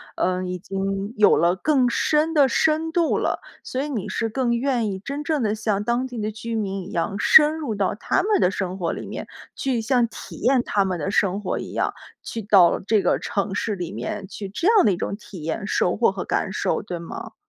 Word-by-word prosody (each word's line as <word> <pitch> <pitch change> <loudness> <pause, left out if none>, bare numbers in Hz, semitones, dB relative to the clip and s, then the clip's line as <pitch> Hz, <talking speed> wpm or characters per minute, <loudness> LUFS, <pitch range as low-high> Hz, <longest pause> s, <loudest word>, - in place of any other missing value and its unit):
嗯， 185 0 0
已 180 - -3
经 195 +3 -3
有 210 -1 +5
了 170 +3 +3
更 260 +3 +2
深 305 +6 +1
地 285 -4 +5
深 315 +5 +1
度 335 -1 +2
了。 - - -1 0.2
所 260 - -3
以 295 - -3
你 230 -9 -3
是 225 - -1
更 235 +1 0
愿 245 -3 0
意 190 - -4
真 280 +8 -5
正 295 -4 0
地 210 - +1
像 215 -2 -1
当 240 +3 0
地 245 -3 -7
的 215 0 -2
居 225 +2 -5
民 195 -3 -2
一 - - -10
样， 175 +4 -1
深 300 +6 +7
入 280 -9 -3
到 200 -2 0
他 365 - 0
们 420 0 +2
的 180 - +4
生 185 -1 -3
活 170 -2 -1
里 - - -6
面， - - -6 0.3
去 255 -4 -1
像 245 0 +2
体 225 - -10
验 255 0 +2
他 200 - +2
们 185 -2 -2
的 195 +6 -2
生 195 -2 +1
活 185 - -2
一 - - -7
样， - - 0 0.3
去 230 - -5
到 195 -4 +5
这 210 +1 +1
个 - - +2
城 200 -1 -2
市 210 +1 -1
里 175 -2 -5
面 205 -1 -5
去 200 0 -7
这 330 - -1
样 435 -3 +6
的 205 - +4
一 180 - -1
种 195 - -3
体 190 -6 -11
验、 195 +6 -3
收 180 - +1
获 225 -3 +3
和 195 - -5
感 - - -1
受， 205 - -1
对 180 -4 -5
吗？ 170 0 -8
215 Hz, 250 characters per minute, -23 LUFS, 195-260 Hz, 0.3 s, 深